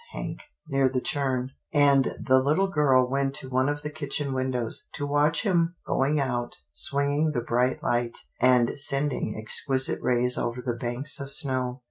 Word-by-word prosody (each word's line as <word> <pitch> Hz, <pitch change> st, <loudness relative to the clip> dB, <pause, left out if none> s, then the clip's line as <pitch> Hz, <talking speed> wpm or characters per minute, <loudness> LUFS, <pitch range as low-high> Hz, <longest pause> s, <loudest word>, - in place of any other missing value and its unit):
Hank, -, -, -5 dB, 0.3 s
near 135 Hz, -2 st, +2 dB
the 130 Hz, 0 st, -1 dB
churn," 130 Hz, -4 st, -2 dB, 0.2 s
and 140 Hz, -2 st, +4 dB
the 130 Hz, 0 st, +3 dB
Httle 190 Hz, +8 st, +1 dB
girl 130 Hz, -4 st, +4 dB
went 135 Hz, +1 st, -1 dB
to 135 Hz, -3 st, -5 dB
one 130 Hz, +2 st, +2 dB
of 145 Hz, 0 st, -3 dB
the 150 Hz, -, -4 dB
kitchen 145 Hz, -1 st, -3 dB
windows, 130 Hz, -3 st, -1 dB
to 145 Hz, -, -4 dB
watch 145 Hz, +3 st, +1 dB
him 175 Hz, -4 st, +1 dB
going 145 Hz, +3 st, +1 dB
out, 125 Hz, -3 st, -2 dB, 0.2 s
swinging 145 Hz, -, 0 dB
the 120 Hz, -, -1 dB
bright 125 Hz, +2 st, 0 dB
light, 120 Hz, -1 st, -1 dB, 0.2 s
and 125 Hz, +1 st, +3 dB
sending 140 Hz, -5 st, 0 dB
exquisite 130 Hz, +4 st, 0 dB
rays 125 Hz, 0 st, +2 dB
over 120 Hz, +1 st, -2 dB
the 125 Hz, -1 st, -2 dB
banks 120 Hz, +4 st, -1 dB
of 140 Hz, 0 st, -5 dB
snow. 130 Hz, -2 st, +1 dB
135 Hz, 165 wpm, -26 LUFS, 125-145 Hz, 0.3 s, and